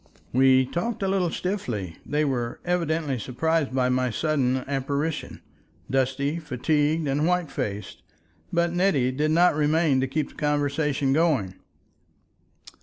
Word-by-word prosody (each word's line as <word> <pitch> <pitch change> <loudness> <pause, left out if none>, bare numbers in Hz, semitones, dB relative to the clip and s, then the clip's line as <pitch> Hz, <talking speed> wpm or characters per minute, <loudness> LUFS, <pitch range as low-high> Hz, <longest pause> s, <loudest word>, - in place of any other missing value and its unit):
We 130 0 +5
talked 195 - -3
a - - +1
little 190 -2 +1
stiffly—they 150 - -3
were 120 -4 -2
evidently 160 -6 0
surprised 155 +5 0
by 130 -1 +1
my 125 0 +1
sudden 130 0 0
apparition, 140 +3 -2 0.5
dusty, 135 +4 0
fatigued, 150 +2 0
and 145 +3 +1
white 180 -3 0
faced; 105 0 -4 0.5
but 170 0 +1
Nettie 175 -9 +2
did 150 +4 0
not 175 +3 +4
remain 150 -2 +2
to 135 - 0
keep 145 +2 -2
the - - -17
conversation 145 -2 0
going. 140 - +1
145 Hz, 125 wpm, -25 LUFS, 130-160 Hz, 0.5 s, We